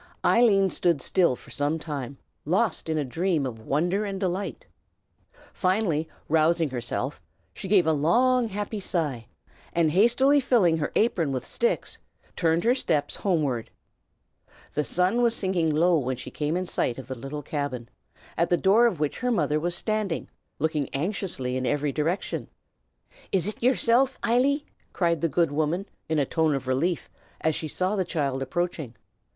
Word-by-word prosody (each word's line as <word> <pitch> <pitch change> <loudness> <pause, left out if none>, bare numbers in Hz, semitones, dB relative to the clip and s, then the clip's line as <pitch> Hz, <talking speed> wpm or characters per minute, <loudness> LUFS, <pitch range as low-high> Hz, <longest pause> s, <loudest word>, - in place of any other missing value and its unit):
Eileen 200 -5 +4
stood 170 -4 +1
still 170 -1 +2
for - - -16
some 145 +3 0
time, 140 -4 -5 0.3
lost 185 +1 0
in 160 - 0
a 150 - 0
dream 160 +2 0
of 115 -4 -5
wonder 175 - 0
and 195 -2 -4
delight. 190 - -3 0.9
Finally 185 -5 0 0.2
rousing 160 -1 +2
herself, 120 -3 -3 0.3
she - - -7
gave 190 -3 +4
a 160 - +3
long, 240 - +3
happy 205 +1 -4
sigh, 150 - -2 0.5
and 165 -2 +2
hastily 240 - +4
filling 210 -11 +3
her 150 - -2
apron 180 -10 +2
with 130 -2 -3
sticks, 480 +1 -1 0.4
turned 165 -1 +1
her 240 - +4
steps 155 - -1
homeward. 140 - 0 1.0
The 150 - 0
sun 180 - +1
was 235 -1 +3
sinking 185 -4 0
low 165 +2 +3
when 130 -1 -2
she - - -8
came 150 +3 -1
in 185 - -2
sight 125 -8 -1
of 130 -3 -8
the 130 - -5
little 135 +4 -6
cabin, 135 -5 -3 0.5
at 170 - +2
the 175 - +3
door 210 +7 +5
of 185 -10 -2
which 150 -2 -1
her 250 - 0
mother 155 - +1
was 175 +2 -1
standing, 215 -5 -2 0.3
looking 150 -2 -1
anxiously 140 -5 -2
in 130 -1 -1
every 145 +2 0
direction. 160 +6 -2 0.8
"Is 185 -3 +2
it 210 - -4
yersilf, 255 +1 +3
Eily?" 275 +5 +2 0.3
cried 170 -4 +1
the 165 - +1
good 165 +1 +1
woman 155 +6 0 0.2
in 160 - +1
a 145 - +2
tone 160 +1 +1
of 135 -1 -4
relief, 145 +7 0 0.3
as 160 - +2
she 155 - -4
saw 185 +6 -1
the 190 - +1
child 140 -7 -2
approaching. 155 -3 -3
170 Hz, 165 wpm, -26 LUFS, 145-195 Hz, 1.0 s, door